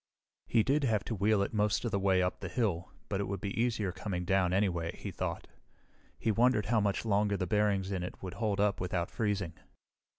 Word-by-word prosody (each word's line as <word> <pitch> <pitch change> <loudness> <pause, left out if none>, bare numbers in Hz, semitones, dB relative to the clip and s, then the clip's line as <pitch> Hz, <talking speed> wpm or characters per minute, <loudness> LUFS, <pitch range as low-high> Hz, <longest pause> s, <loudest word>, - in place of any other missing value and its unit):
He 115 -2 +3
did 140 +4 +2
have 110 -5 +2
to - - -4
wheel 100 +1 +3
it 100 - -4
most 105 +2 +1
of 115 - -1
the 100 - +1
way 95 -1 +3
up 90 - -1
the 90 - -5
hill, 95 -7 -1 0.2
but 100 - -2
it - - -1
would 100 -1 -3
be 100 +1 -3
easier 110 -5 0
coming 90 -1 -4
down 95 -1 +2
anyway, 90 -4 0
he - - -5
thought. - - -3 0.7
He 110 - +1
wondered 115 -1 +3
how 110 0 +2
much 100 +1 0
longer 100 -1 +2
the 95 - -1
bearings 100 -2 +1
in 95 -2 -1
it 90 - -7
would 90 -1 -5
hold 100 +1 -1
up 100 -2 +2
without 90 -1 -1
freezing. 100 -6 -1
100 Hz, 220 wpm, -32 LUFS, 95-110 Hz, 0.7 s, He